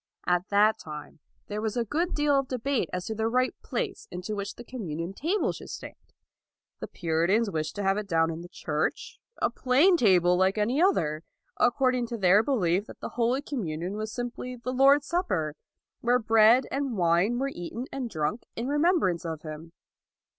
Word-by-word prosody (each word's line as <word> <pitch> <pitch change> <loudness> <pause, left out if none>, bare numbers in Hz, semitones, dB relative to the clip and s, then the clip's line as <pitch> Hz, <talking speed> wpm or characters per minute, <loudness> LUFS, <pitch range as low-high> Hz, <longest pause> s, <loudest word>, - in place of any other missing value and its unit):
At 180 +1 +1
that 210 +2 +4
time 150 0 -9 0.3
there 210 +1 -4
was 220 +1 -2
a 235 - +1
good 335 - -1
deal 295 -1 +2
of 275 -1 +2
debate 255 - -1
as 180 0 -3
to 220 - -3
the 220 +1 -1
right 255 +2 +1
place 425 -6 -4
in 180 - -6
which 205 -1 -3
the 240 - -10
communion 180 -8 -5
table 345 - 0
should - - -10
stand. - - -7 0.9
The - - -5
Puri 165 -1 -1
tans 215 +2 +2
wished 155 -2 -3
to 205 - -3
have 195 +1 +2
it 210 - -6
down 165 -2 +2
in 165 +1 -6
the 175 - -10
church, 155 -2 -3 0.2
a - - +3
plain 285 +9 +4
table 180 - +4
like 190 +3 +2
any 235 +8 +1
other, 160 - +2 0.3
according 250 -1 +2
to 235 0 -4
their 195 0 +5
belief 205 -7 +1
that - - -12
the - - -5
Holy 245 +4 0
Communion 185 - -4
was 215 0 -4
simply 245 +1 -5
the 250 +1 -5
Lord's 275 +2 +5
Supper, 180 - -1 0.4
where 245 +1 +3
bread 225 +2 +5
and 270 -4 -2
wine 175 +6 +2
were 275 +2 -1
eaten 175 +8 -6
and 260 -3 -4
drunk 155 +5 -2
in 235 +2 -3
remembrance 295 - +2
of 160 -2 -5
Him. 155 +1 -8
220 Hz, 190 wpm, -27 LUFS, 175-255 Hz, 0.9 s, their